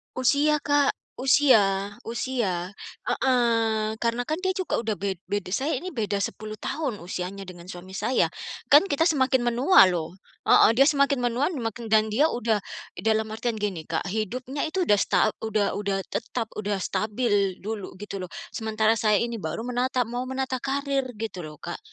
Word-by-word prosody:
Usia 285 +4 +3
Kak, 285 -1 +3 0.2
usia 220 -8 +4 0.2
usia, 220 -7 -2 0.4
heeh. 230 -4 +2
Karena 235 +1 0
kan 310 +5 -2
dia 375 0 0
juga 375 -3 -1
sudah 220 -2 -2
bed 195 -2 -3
beda. 195 -2 -3
Saya 280 +9 0
ini 355 +8 -4
beda 210 - -1
10 215 0 -5
tahun 265 - -3
usianya 185 +2 -5
dengan 175 -2 -11
suami 185 0 -9
saya. 255 - +1 0.4
Kan 295 +7 +8
kita 320 -1 +1
semakin 265 -6 +3
menua 275 +11 +6
loh, 170 0 -3 0.3
heeh, - - +7
dia 275 - +7
semakin 280 -2 +3
menua 245 +5 +1
makin 225 0 -4
dan 220 0 +5
dia 280 +9 +3
sudah 225 -3 0 0.3
dalam 220 0 +1
artian 225 0 -2
gini 195 -6 -2
Kak, 160 +2 -3
hidupnya 245 +7 -3
itu 365 +2 0
sudah 205 -1 +4
sta - - +1 0.3
udah 215 -2 0
udah 200 -1 -1
tetap, 230 0 -3
sudah 205 -1 -2
stabil 205 -2 0
dulu 205 -3 -6
gitu 200 -2 -6
loh, 180 - -7 0.3
sementara 220 0 +1
saya 210 -1 +3
ini 235 0 -2
baru 175 +9 -4
menata 250 0 0
mau 245 +1 -3
menata 260 -1 -2
karir 275 0 0
gitu 215 -4 -5
loh 150 -1 -9
Kak. - - -6
225 Hz, 165 wpm, -25 LUFS, 205-260 Hz, 0.4 s, Kan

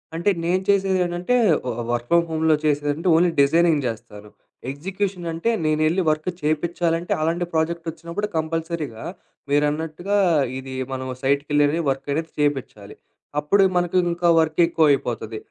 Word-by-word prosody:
అంటే 170 +5 +1
నేను 180 +2 +1
చేసేది 195 -1 +3
ఏంటంటే, 175 +7 -1 0.3
ఒ - - 0
ఆహ్, - - -5
వర్క్ 120 0 -2
ఫ్రమ్ 170 0 +4
హోమ్‌లో 160 -1 +2
చేసేదేంటంటే, 145 +3 0
ఓన్లీ 175 +1 +4
డిజైనింగ్ 160 0 +3
చేస్తాను. 105 -2 -8 0.4
ఎగ్జిక్యూషన్ 185 +3 -4
అంటే 165 +8 -1 0.2
నేనెళ్లి 155 +4 +2
వర్క్ 155 +2 -1
చేపిచాలంటే, 165 +2 0
అలాంటి 170 +2 0
ప్రాజెక్ట్ 165 +1 -1
వచ్చినప్పుడు 170 +6 -5
కంపల్సరీగా 160 -6 -3 0.5
మీరన్నట్టుగా 155 +7 0 0.4
ఇది 130 0 -7 0.2
మనం 130 0 -4
సైట్‌కెళ్ళి 145 +3 +1
వర్క్ 135 +1 -6
అనేది 160 +2 -3
చేపిచాలి. 135 -8 -2 0.4
అప్పుడే 195 +7 +3
మనకు 175 +1 +1
ఇంకా 170 0 +1
వర్క్ 160 +1 0
ఎక్కువ 165 -2 +2
అయిపోతది. 115 -4 -2
160 Hz, 135 wpm, -22 LUFS, 145-175 Hz, 0.5 s, ఫ్రమ్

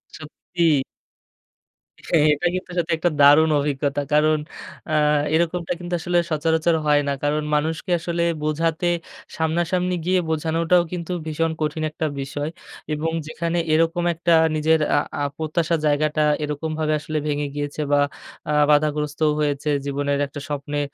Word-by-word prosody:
সত্যি। 160 +1 -1 1.3
হ্যাঁ, 155 -3 +4
এটা 150 - -5
কিন্তু 185 0 -5
সত্যি 170 -1 0
একটা 175 +2 +1
দারুণ 145 +3 +7
অভিজ্ঞতা। 145 0 -1
কারণ 155 +1 +4 0.5
আ - - -1 0.4
এরকমটা 170 +1 0
কিন্তু 175 0 -6
আসলে 175 +1 0
সচরাচর 160 +2 +1
হয় 145 0 +4
না। 140 - +1
কারণ 150 +1 0
মানুষকে 160 +4 -1
আসলে 170 0 -2 0.2
বোঝাতে, 165 +3 0 0.5
সামনাসামনি 175 +3 0
গিয়ে 185 +1 +3
বোঝানোটাও 165 +2 +2
কিন্তু 180 -1 -5
ভীষণ 160 +1 -1
কঠিন 155 +1 -1
একটা 155 - -3 0.2
বিষয়। 145 +2 -4 0.4
এবং 155 +2 -1 0.2
যেখানে 165 +2 -2 0.2
এরকম 165 +2 +2
একটা 170 +1 +1 0.2
নিজের 160 +1 +3 0.2
আ - - +5 0.2
আ - - +1
প্রত্যাশা 160 +1 0
জায়গাটা, 150 +1 +2 0.2
এরকমভাবে 155 +1 -2
আসলে 155 +1 -4
ভেঙে 145 0 -1
গিয়েছে 145 +1 -3
বা 145 - +4 0.5
আ - - +1 0.2
বাধাগ্রস্থও 150 +1 +2
হয়েছে, 145 0 -1 0.2
জীবনের 140 0 -1
একটা 145 +1 -8
স্বপ্নে। 145 0 -3
155 Hz, 140 wpm, -22 LUFS, 150-165 Hz, 1.3 s, দারুণ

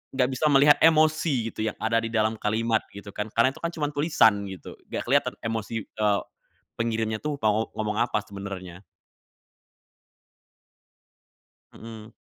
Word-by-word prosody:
nggak 125 -1 +2
bisa 130 +4 -1
melihat 145 +1 +6
emosi, 155 -6 +3
gitu, - - -14
yang 105 - -4
ada 115 +1 +2
di - - -1
dalam 110 0 +1
kalimat, 110 +1 0
gitu 100 0 -10
kan. 105 - -3
Karena 115 +3 +4
itu - - -12
kan 170 - -1
cuman 150 -3 -2
tulisan 115 -9 +3
gitu, 95 -2 -9 0.2
nggak - - -3
kelihatan - - +2
emosi, 115 0 -3
eee, 105 -2 0 0.6
pengirimnya 110 -1 -1
tuh 150 -1 -2
mau 110 +1 +1
ngomong 105 -1 -2
apa - - +1
sebenarnya. 95 -3 -8 2.9
Mhm. 110 -1 -11
110 Hz, 140 wpm, -26 LUFS, 105-135 Hz, 2.9 s, melihat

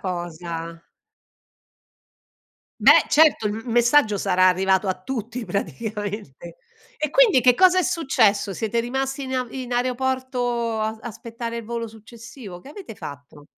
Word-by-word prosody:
cosa. 170 -2 -5 2.0
Beh, - - +7
certo, 300 -8 +4
il 205 - -1
m 225 +1 -6
messaggio 235 -3 +3
sarà 185 0 +3
arrivato 190 +1 +1
a 185 - -2
tutti 235 +2 -5
praticamente. 205 - -5 0.4
E 305 - -1
quindi 430 - +5
che 250 0 +5
cosa 370 +2 +5
è - - +3
successo? 225 - +1
Siete 220 +4 -1
rimasti 270 +3 -3
in 260 -1 -4
a 255 -1 -1
in 255 -1 -6
aeroporto 245 -2 -1
a 220 +1 -2
aspettare 230 0 -6
il 230 - -7
volo 230 +1 -4
successivo? 225 -2 -12
Che 270 - -14
avete 360 - -10
fatto? 140 +1 -11
230 Hz, 135 wpm, -23 LUFS, 200-255 Hz, 2.0 s, Beh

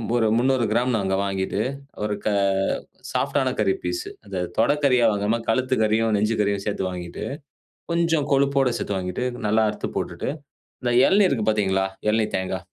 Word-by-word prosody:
ஒரு 115 -2 +3
300கிராம் 120 -1 +2
நாங்க 95 -2 -1
வாங்கிட்டு, 95 +1 -1 0.4
ஒரு 105 0 -1
க - - +2 0.8
சாஃப்ட்டான - - +1
கறி 95 - +3
பீஸு. 90 0 -3 0.2
அத 95 -3 -4 0.2
தொடக்கறியா 130 0 +3
வாங்காம 105 +3 0
கழுத்து 130 +3 +2
கறியும், 110 +1 +2
நெஞ்சு 105 +2 +1
கறியும் 100 -1 0
சேர்த்து 100 -2 -2
வாங்கிட்டு, 90 -1 -6 0.7
கொஞ்சம் 165 -3 +1
கொழுப்போடு 140 -1 +3
சேர்த்து 100 - -2
வாங்கிட்டு 90 +6 -3 0.2
நல்லா 110 +1 +3
அறுத்து 105 - -5
போட்டுட்டு, - - -3 0.5
இந்த 120 -1 +1
இளநீ 200 +1 +5
இருக்கு 115 -10 -1
பாத்தீங்களா? 95 -3 +1 0.2
இளநீத் 110 0 0
தேங்கா. 95 0 -2
110 Hz, 145 wpm, -23 LUFS, 100-125 Hz, 0.8 s, இளநீ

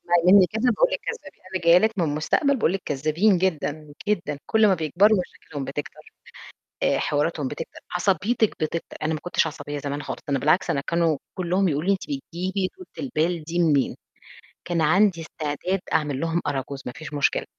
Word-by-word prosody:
اسمعي 175 0 +2
منّي 195 -3 +8
كذب 220 +4 -4
باقول - - +3
لِك - - 0
كذابين 475 - -7
أنا 180 - -1
جاية 170 +1 +8
لِك 220 0 0
من 170 - +3
المستقبل 155 - +1
باقول 180 - +2
لِك 195 -1 -3
كذابين 155 +8 +2
جدًا، 155 -4 -2 0.2
جدًا 175 -8 -1
كل 220 -1 +4
ما 195 - +5
بيكبروا 185 +6 +3
مشاكلهم 145 -5 -7
بتكتر، 140 +2 -7 0.7
آآ، - - +3
حواراتهم 150 -1 0
بتكتر، - - -7
عصبيتِك 200 +5 +2
بتكتر، 160 +2 -3
أنا 155 +1 0
ما 155 - -2
كنتش 180 -2 +1
عصبية 145 -2 -6
زمان 145 +1 -4
خالص - - -5
ده - - -27
أنا 135 - +2
بالعكس 155 +7 +2
أنا 140 - +1
كانوا 165 -1 +1 0.2
كلّهم 185 +2 +1
يقولوا 155 +3 -1
لي 200 - +6
أنتِ 190 - -4
بتجيبي 190 - -3
طولة 370 - -12 0.2
البال 165 -5 0
دي 170 +3 -3
منين؟ 150 -5 +2 0.7
كان 170 -1 -1
عندي 180 +3 +3
استعداد 160 +4 -3
أعمل 145 -3 0
لهم 165 +1 0
أراجوز 135 -1 -3
ما 125 - -4
فيش 155 -1 -8
مشكلة، 145 -1 +1
170 Hz, 190 wpm, -24 LUFS, 150-190 Hz, 0.7 s, منّي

